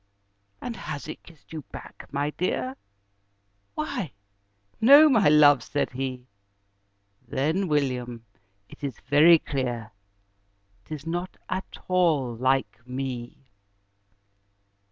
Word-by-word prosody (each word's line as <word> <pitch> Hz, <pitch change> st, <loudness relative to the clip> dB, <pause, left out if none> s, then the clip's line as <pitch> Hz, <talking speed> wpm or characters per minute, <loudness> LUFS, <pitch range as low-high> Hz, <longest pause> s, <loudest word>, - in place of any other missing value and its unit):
"And 240 Hz, -, -5 dB
has 150 Hz, -3 st, -6 dB
it 155 Hz, -, -8 dB
kissed 165 Hz, -1 st, -18 dB
you 155 Hz, -, -5 dB
back, -, -, -11 dB
my 145 Hz, +1 st, -1 dB
dear?" 135 Hz, -7 st, -2 dB, 1.0 s
"Why 155 Hz, 0 st, -3 dB, 0.7 s
no 285 Hz, +7 st, +9 dB
my 220 Hz, -, +4 dB
love," 145 Hz, -3 st, +6 dB
said 145 Hz, +5 st, -2 dB
he. 130 Hz, -1 st, -4 dB, 1.0 s
"Then, 160 Hz, +8 st, 0 dB
William, 125 Hz, -6 st, -1 dB, 0.4 s
it -, -, -16 dB
is 135 Hz, -5 st, -4 dB
very 150 Hz, +5 st, +6 dB
clear 120 Hz, -7 st, -4 dB, 0.9 s
'Tis 155 Hz, -1 st, -7 dB
not 175 Hz, +3 st, -4 dB
at 185 Hz, +1 st, -4 dB
all 160 Hz, -10 st, +2 dB
LIKE 130 Hz, -2 st, 0 dB
ME!" 125 Hz, 0 st, -6 dB
145 Hz, 105 wpm, -26 LUFS, 130-165 Hz, 1.0 s, no